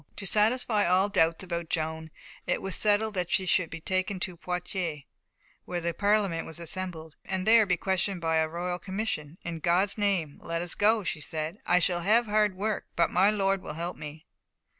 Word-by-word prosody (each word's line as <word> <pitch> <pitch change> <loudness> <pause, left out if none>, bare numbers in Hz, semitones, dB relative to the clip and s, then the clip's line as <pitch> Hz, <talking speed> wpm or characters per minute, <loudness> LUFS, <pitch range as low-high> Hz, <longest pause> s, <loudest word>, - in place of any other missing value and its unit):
To 200 - -6
satisfy 215 +1 +2
all 185 +3 +3
doubts 165 -2 +2
about 170 -2 -4
Joan, 160 0 -2 0.4
it - - +1
was 195 -2 -4
settled 215 +1 +2
that 180 -3 -1
she 190 - +1
should 180 -2 +2
be 165 - -7
taken 185 +3 -1
to 180 - -3
Poitiers, 180 -3 -4 0.6
where 175 - -3
the 170 0 -2
Parliament 200 -3 +1
was 160 - -5
assembled, 170 -2 -6
and 190 -1 -3
be 220 - +4
there 225 -2 +6
questioned 190 +1 -1
by 165 -1 +1
a 160 0 +2
royal 175 +2 -3
commission. 190 -6 -4
"In 170 -1 -4
God's 180 +6 +2
name, 185 -8 0
let 165 +1 -3
us 175 - 0
go," 215 +1 +3
she 165 -3 -3
said; 155 +6 -4
"I 175 - +5
shall 175 0 +1
have 220 +6 +3
hard 210 -2 +2
work, 210 +3 -2
but 170 -1 +2
my 190 +3 +4
Lord 195 -2 +1
will 150 - -7
help 170 +2 -4
me." 155 +1 -9
180 Hz, 195 wpm, -28 LUFS, 165-200 Hz, 0.6 s, there